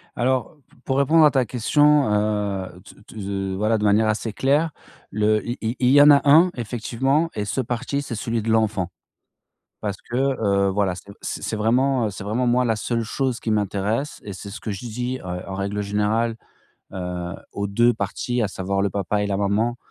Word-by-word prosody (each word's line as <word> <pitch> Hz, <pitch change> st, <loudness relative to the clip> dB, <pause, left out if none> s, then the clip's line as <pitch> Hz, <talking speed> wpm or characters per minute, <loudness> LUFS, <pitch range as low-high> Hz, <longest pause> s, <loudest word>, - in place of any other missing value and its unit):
Alors 130 Hz, +4 st, 0 dB
p -, -, -25 dB
pour 135 Hz, -, 0 dB
répondre 155 Hz, +4 st, +5 dB
à 150 Hz, -, +5 dB
ta 130 Hz, -3 st, +2 dB
question, 145 Hz, +4 st, +3 dB
heu, 105 Hz, -3 st, -1 dB
t -, -, -15 dB
t 110 Hz, -, -10 dB
z 95 Hz, -, -5 dB
heu, 95 Hz, -1 st, -2 dB
voilà 110 Hz, +3 st, +1 dB
de 105 Hz, -, -3 dB
manière 105 Hz, +1 st, +4 dB
assez 110 Hz, 0 st, -1 dB
claire, 145 Hz, +7 st, +1 dB, 0.4 s
le 105 Hz, +1 st, +2 dB
il 120 Hz, -, -3 dB
il 115 Hz, +2 st, -2 dB
il 125 Hz, -1 st, +3 dB
y 145 Hz, +1 st, +7 dB
en 145 Hz, -, +8 dB
a 140 Hz, -, +6 dB
1 165 Hz, +6 st, +7 dB
effectivement 125 Hz, +6 st, -1 dB
et 105 Hz, -, -2 dB
ce 115 Hz, +6 st, -1 dB
parti, 125 Hz, +4 st, -2 dB
c'est 120 Hz, -5 st, -5 dB
celui 115 Hz, +2 st, -2 dB
de 110 Hz, -, -3 dB
l'enfant 110 Hz, -5 st, +1 dB, 0.9 s
parce 100 Hz, -2 st, -3 dB
que, 120 Hz, -, -2 dB
heu, 110 Hz, -8 st, +1 dB
voilà 95 Hz, -1 st, 0 dB
c 90 Hz, -, -10 dB, 0.2 s
c -, -, -4 dB
c'est 110 Hz, -, -2 dB
vraiment, 125 Hz, +3 st, +2 dB
heu, -, -, -2 dB
c'est 95 Hz, 0 st, -8 dB
vraiment 120 Hz, +5 st, -1 dB
moi, 125 Hz, +1 st, +3 dB
la 115 Hz, -2 st, +1 dB
seule 115 Hz, +2 st, -1 dB
chose 130 Hz, +2 st, -2 dB
qui 110 Hz, -, -3 dB
m'intéresse 105 Hz, +6 st, -1 dB
et 100 Hz, -, -7 dB
c'est 100 Hz, +2 st, -8 dB
ce 110 Hz, -, -8 dB
que 110 Hz, -, -5 dB
je 100 Hz, -2 st, -5 dB
dis, 125 Hz, +3 st, -3 dB
heu, 90 Hz, +1 st, -5 dB
en 95 Hz, -, -5 dB
règle 100 Hz, +2 st, -2 dB
générale, 105 Hz, +3 st, 0 dB, 0.6 s
heu, 90 Hz, -1 st, -4 dB, 0.2 s
aux 100 Hz, -, -2 dB
2 120 Hz, +4 st, +3 dB
parties, 120 Hz, +5 st, -2 dB
à 105 Hz, -, 0 dB
savoir 95 Hz, 0 st, -2 dB
le 100 Hz, -, +1 dB
papa 100 Hz, +1 st, -1 dB
et -, -, 0 dB
la 100 Hz, -, 0 dB
maman 105 Hz, +4 st, 0 dB
110 Hz, 215 wpm, -23 LUFS, 100-125 Hz, 0.9 s, en